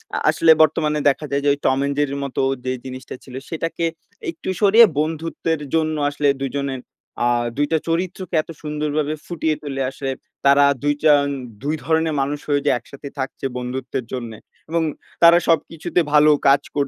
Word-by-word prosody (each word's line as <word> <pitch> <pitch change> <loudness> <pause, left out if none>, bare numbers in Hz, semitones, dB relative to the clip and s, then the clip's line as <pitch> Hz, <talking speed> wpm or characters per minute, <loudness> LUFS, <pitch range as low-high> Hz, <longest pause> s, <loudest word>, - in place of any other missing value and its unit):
আ - - 0
আসলে 165 - +5
বর্তমানে 150 0 +2
দেখা 145 +2 -2
যায় 140 - +1
যে 145 - +3
ওই 140 - -4
'Tom 130 - +3
and 140 - -1
Jerry' 145 -1 0
এর 140 - -4
মতো 140 - -2 0.2
যে 130 - 0
জিনিসটা 130 0 -7
ছিল 130 -1 -11
সেটাকে 165 +1 -2 0.5
একটু 325 - -7
সরিয়ে 220 +3 +8
বন্ধুত্বের 160 0 -2
জন্য 155 -1 +1
আসলে 145 0 -1
দুজনের 135 0 -2 0.5
আ - - +4 0.3
২ 145 - +3
টা 160 - +4
চরিত্রকে 180 +1 -2
এত 155 - -24
সুন্দরভাবে 150 0 -2
ফুটিয়ে 160 -2 -1
তুলে 135 -2 -4
আসলে 135 0 -4 0.3
তারা 140 +1 +6 0.2
২ 145 - +3
টা, 155 -1 +7 0.5
২ 150 +2 0
ধরনের 160 +1 +1
মানুষ 145 +2 -2
হয়ে 145 -1 +2
যে 145 - +4
একসাথে 140 +4 -11
থাকছে 135 +1 -4
বন্ধুত্বের 125 0 -4
জন্যে 115 -4 -5 0.3
এবং 165 0 +1 0.4
তারা 170 +1 +9
সবকিছুতে 165 +2 0
ভালো 150 0 +6 0.2
কাজ 140 +1 +5
কর 145 -1 +2
150 Hz, 175 wpm, -21 LUFS, 140-160 Hz, 0.5 s, তারা